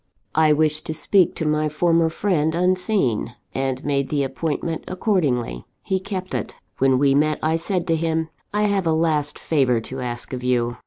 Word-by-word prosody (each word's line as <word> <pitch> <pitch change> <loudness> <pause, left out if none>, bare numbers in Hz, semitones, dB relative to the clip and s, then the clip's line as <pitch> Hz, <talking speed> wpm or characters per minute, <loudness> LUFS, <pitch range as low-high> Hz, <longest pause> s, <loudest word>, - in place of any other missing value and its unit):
I 155 -1 +4
wished 155 0 +1
to 155 - -2
speak 190 +2 +3
to 160 - -3
my 150 0 +1
former 165 +1 +2
friend, 160 -3 0
unseen, 180 - +1 0.2
and 135 0 -2
made 140 -1 0
the 145 -2 +1
appointment 155 +4 -3
accordingly. 145 - 0 0.2
He 190 -1 0
kept 185 -1 -5
it. - - -3 0.2
"When 135 -1 +4
we 140 0 +3
met, 150 +2 +2
I 160 +1 +2
said 175 +1 -2
to 165 -3 +2
him: 160 0 -1 0.2
I 210 +1 +1
have 200 -4 +1
a 160 - +3
last 160 -2 +1
favour 130 -7 +1
to 130 +4 -7
ask 120 0 -4
of 125 -1 -4
you. 120 -1 0
155 Hz, 180 wpm, -22 LUFS, 135-170 Hz, 0.2 s, I